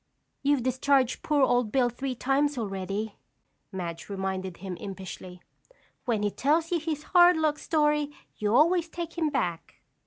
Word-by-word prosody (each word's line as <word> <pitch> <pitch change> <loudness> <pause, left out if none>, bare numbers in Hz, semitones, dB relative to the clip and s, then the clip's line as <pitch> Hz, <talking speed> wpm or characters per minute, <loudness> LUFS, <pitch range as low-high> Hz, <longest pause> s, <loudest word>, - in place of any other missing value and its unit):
"You've 280 -3 +2
discharged 260 0 +2
poor 295 -2 +2
old 245 -4 +2
Bill 255 0 +3
three 255 +2 -4
times 275 +3 +1
already," 200 0 -3 0.5
Madge 175 -3 -6
reminded 190 -2 -3
him 190 -1 -6
impishly. 185 -2 -8 0.6
"When 225 -4 0
he 205 - +1
tells 315 - +1
you 345 - +2
his 310 -2 -3
hard 355 -1 +7
luck 310 -1 +1
story, 300 -2 +1 0.3
you 210 -1 -1
always 335 +4 +4
take 335 0 -6
him 325 -3 +1
back." 175 - -2
255 Hz, 150 wpm, -27 LUFS, 195-300 Hz, 0.6 s, hard